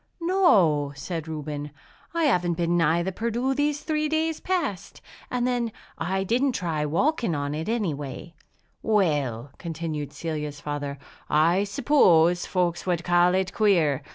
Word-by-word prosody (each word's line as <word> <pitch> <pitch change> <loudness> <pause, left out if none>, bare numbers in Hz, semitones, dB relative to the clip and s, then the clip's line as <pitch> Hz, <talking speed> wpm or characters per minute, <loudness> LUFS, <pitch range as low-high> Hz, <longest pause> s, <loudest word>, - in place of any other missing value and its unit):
"No," 190 - +3
said 160 +3 -5
Reuben, 150 -2 -5 0.4
"I 335 -1 -1
haven't 180 - +2
been 170 +1 0
nigh 170 0 +2
the 190 - -2
Perdu 235 +6 -1
these 290 +1 0
three 305 -1 0
days 315 0 0
past. 330 - -3 0.3
And 245 -1 -1
then 245 -2 0 0.2
I 190 +1 -1
didn't 250 +7 +1
try 160 -7 -1
walking 230 - +1
on 145 0 -2
it, 160 +6 -4
any 215 -8 0
way." 145 +4 -7 0.5
"Well," 145 - 0
continued 160 -3 -4
Celia's 150 -3 -5
father, 145 -1 -4 0.3
"I 170 +6 +3
suppose 180 - +3
folks 180 -1 -1
would 175 -2 0
call 175 +1 +3
it 190 0 -1
queer! 170 -10 +2
175 Hz, 145 wpm, -25 LUFS, 150-235 Hz, 0.5 s, No